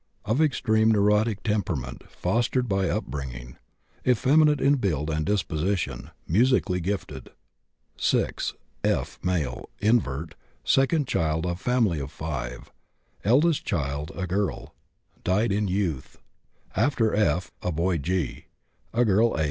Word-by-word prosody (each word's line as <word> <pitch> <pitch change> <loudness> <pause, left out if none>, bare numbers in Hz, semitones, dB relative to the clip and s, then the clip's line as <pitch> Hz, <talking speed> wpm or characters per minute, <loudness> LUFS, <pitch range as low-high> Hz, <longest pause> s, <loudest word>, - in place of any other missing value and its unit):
Of 110 +8 +1
extreme 110 -7 +3
neurotic 105 0 +2
temperament 95 - -2
fostered 120 +2 0
by 95 -3 +1
upbringing. 60 -3 -4 0.5
Effeminate 145 +5 +4
in 140 +2 +4
build 80 - -1
and 80 0 0
disposition; 80 -7 -1 0.2
musically 105 -1 +3
gifted. 95 +3 -4 0.7
6. - - 0 0.3
F., - - 0
male, 80 -9 -2
invert, 85 - +1 0.3
second 135 +1 +2
child 80 -3 0
of 90 +1 -3
family 115 -10 +2
of 70 0 -5
5. 65 -7 -5 0.5
Eldest 145 +8 +3
child 70 -1 -2
a 95 - -2
girl, 95 +2 -2 0.5
died 105 +4 +2
in 105 +1 +1
youth. 90 -8 -2 0.6
After 115 -1 +2
F. 90 -4 +1
a 90 - -1
boy 85 +2 0
G., 85 -1 -2 0.5
a 120 +1 +4
girl 110 +3 +3
H. - - -2
95 Hz, 120 wpm, -26 LUFS, 80-115 Hz, 0.7 s, Effeminate